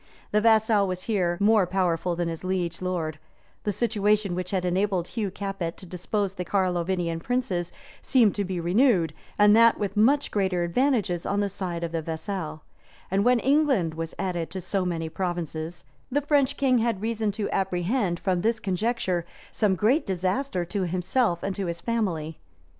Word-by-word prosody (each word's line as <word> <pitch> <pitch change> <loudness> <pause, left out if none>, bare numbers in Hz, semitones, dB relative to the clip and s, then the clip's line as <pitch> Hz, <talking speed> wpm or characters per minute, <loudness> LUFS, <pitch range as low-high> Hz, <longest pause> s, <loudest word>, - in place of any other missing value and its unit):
The 210 - +3
vassal 220 -2 +4
was 185 0 -3
here 180 -6 0
more 205 -2 +4
powerful 180 -2 0
than 175 0 -1
his 165 +1 -5
liege 180 -2 -2
lord: 165 -4 -2 0.5
the 210 - +1
situation 210 -2 +1
which 180 0 -3
had 185 -2 -1
enabled 185 0 0
Hugh 215 -4 -2
Capet 195 -3 -4
to - - -10
depose 190 +3 -2
the 180 - -4
Carlovingian 175 -3 0
princes, 185 -5 -1 0.3
seemed 235 -6 +4
to 205 - -1
be 185 -2 -3
renewed, 175 - +3 0.2
and 210 0 +6
that 230 0 +6
with 200 0 -3
much 260 +8 +3
greater 190 -4 +1
advantages 200 -2 +1
on 200 - -1
the 205 -1 0
side 180 -3 -4
of 170 - -3
the 165 -1 -2
vassal: 160 -1 -5 0.5
and 195 +1 +2
when 250 +2 +4
England 270 - +2
was 165 0 -5
added 175 -3 -2
to 190 - -5
so 190 +1 -1
many 165 -2 -2
provinces, 170 -1 -4 0.3
the 290 +3 +2
French 285 -2 +2
king 260 -3 +3
had 225 -3 -1
reason 220 -2 0
to 205 0 -2
apprehend, 185 0 0
from 185 -2 0
this 225 +2 +1
conjuncture, 190 -2 -1 0.3
some 205 -4 +1
great 235 - +2
disaster 185 +2 -1
to 190 +1 -2
himself 185 +2 0
and 195 -1 -2
to 195 -1 -3
his 170 0 -3
family. 170 -10 -2
190 Hz, 175 wpm, -26 LUFS, 175-215 Hz, 0.5 s, and